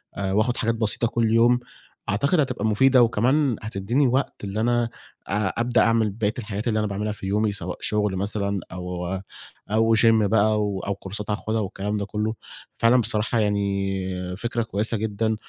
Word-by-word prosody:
آآ، 95 -1 -2
وآخد 110 +5 +1
حاجات 115 -1 0
بسيطة 110 +1 +1
كل 115 -1 0
يوم، 120 +2 +4 0.5
أعتقد 140 - +2
هتبقى 125 -7 0
مفيدة 125 +4 +5
وكمان 125 +3 +2
هتديني 110 +6 0
وقت 130 -3 -1
اللي 100 +2 -3
أنا 120 0 +1 0.4
آآ، 100 0 0
أبدأ 120 0 +2
أعمل 115 -2 +3
بقية 105 +1 -1
الحاجات 105 0 -4
اللي 110 -1 +1
أنا 105 - 0
باعملها 105 +2 -2
في 100 - -8
يومي 105 +2 +1
سواء 90 -2 -4
شغل 105 -2 0
مثلًا 100 0 -1
أو 90 -1 -5 0.6
أو 115 +1 +3
gym - - +3 0.2
بقى 105 +1 +2
و 100 -2 -1
أو 100 +1 -3
كورسات 100 +2 -6
هاخدها 110 +1 -1
والكلام 105 +1 -3
ده 100 - -2
كله، 105 +2 -2 0.4
فعلًا 120 +2 +4
بصراحة 110 +1 +1
يعني 100 -2 0 0.5
فكرة 120 +1 -2
كويسة 110 +1 0
جدًا 110 +1 -1
110 Hz, 170 wpm, -24 LUFS, 100-115 Hz, 0.6 s, مفيدة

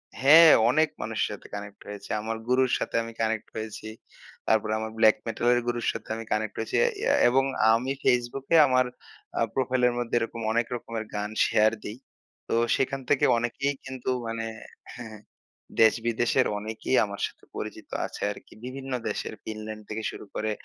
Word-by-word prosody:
হ্যা, 135 +3 +5 0.4
অনেক 155 +4 +3
মানুষের 110 -1 -1
সাথে 105 - -9
কানেক্ট 100 0 -8
হয়েছি। 105 -1 -8
আমার 110 +1 -3
গুরুর 125 0 +3
সাথে - - -4
আমি 115 - -8
কানেক্ট 110 -1 -1
হয়েছি। 110 0 -6 0.6
তারপরে 110 -1 +2
আমার 110 0 -4
ব্ল্যাক 110 -1 +6
মেটালের 120 +2 +2
গুরুর 120 -1 -1
সাথে - - -8
আমি 115 - -6
কানেক্ট 105 -1 -1
হয়েছি। 110 - -3 0.5
এবং 135 +2 +3 0.3
আমি 125 +4 0
ফেসবুকে 125 +5 +1
আমার 130 0 +3 0.7
প্রোফাইলের 125 -2 +2
মধ্যে 120 -1 -2
এরকম 115 0 -4
অনেক 115 +1 +1
রকমের 115 -2 -5
গান 105 0 -2 0.2
শেয়ার 110 0 +4
দেই। 105 - -6 0.5
তো - - -2 0.2
সেখান 135 +1 -1
থেকে 145 - +4
অনেকেই 130 +4 -1
কিন্তু 130 -1 -5 0.2
মানে 115 0 -3 0.5
হ্যা, 120 - -8
হ্যা, 110 - -10 0.6
দেশ-বিদেশের 115 +3 +3
অনেকেই 110 +4 -2
আমার 100 0 -7
সাথে - - -18
পরিচিত - - -6 0.2
আছে - - -8
আরকি। - - -12
বিভিন্ন 135 +1 -7 0.2
দেশের 105 - -4
ফিনল্যান্ড 110 0 -7
থেকে 110 +1 -4
শুরু - - -10
করে, 110 0 -1
115 Hz, 155 wpm, -27 LUFS, 110-125 Hz, 0.7 s, ব্ল্যাক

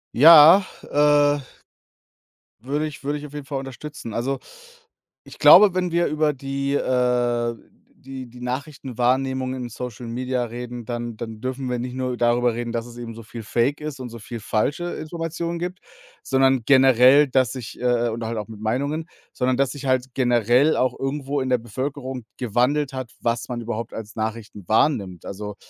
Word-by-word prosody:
Ja. 160 +5 +9 0.2
Äh, 145 0 +3 1.2
würde 145 +5 -1
ich 150 - -11
würde 145 +1 -1
ich 145 - -9
auf 145 - -15
jeden 145 -2 -7
Fall 140 0 -3
unterstützen. 135 -2 -8
Also, 130 +5 -2 0.9
ich - - -14
glaube, 205 -2 +8
wenn 180 -2 -1
wir 170 0 +2
über 155 0 +1
die, 140 0 -3
äh 120 -3 +1 0.5
die 130 -1 -8
die 125 +1 -13
Nachrichtenwahrnehmung 130 0 -1
in 125 -2 -5
Social 120 0 -7
Media 125 +1 -2
reden, 120 0 -7
dann 120 -1 -4
dann 110 -2 -7
dürfen 130 0 -3
wir 125 - -1
nicht 125 +1 -5
nur 130 -1 -2
darüber 120 0 +2
reden, 120 0 -4
dass 115 0 -3
es 120 -1 -12
eben 120 -1 -7
so 115 - -10
viel 115 +1 -9
fake 120 +7 0
ist 150 -3 -6
und 125 - -5
so 115 0 -10
viel 115 +2 -8
falsche 145 +12 -1
Informationen 165 +1 -4
gibt, 180 +2 -5 0.4
sondern 135 -1 +2
generell, 135 +1 +6
dass 130 -2 +2
sich, 125 -4 -8
äh, 120 -1 +1
äh - - +1
oder 115 0 -4
halt 115 -1 -3
auch 105 - -5
mit 110 -2 -10
Meinungen 140 +8 -2 0.3
sondern 125 0 0
dass 135 -2 +1
sich 145 -1 -9
halt 130 -1 0
generell 125 +3 +3
auch 130 - 0
irgendwo 140 +1 -2
in 130 - -3
der 125 - +3
Bevölkerung 130 +2 -5
gewandelt 130 +4 0
hat, 130 -3 -6
was 115 0 -1
man 120 -2 -4
überhaupt 115 -1 -5
als 110 -1 -8
Nachrichten 110 -3 -5
wahrnimmt. 105 - +1
Also, 105 +1 -6
130 Hz, 175 wpm, -23 LUFS, 120-140 Hz, 1.2 s, Ja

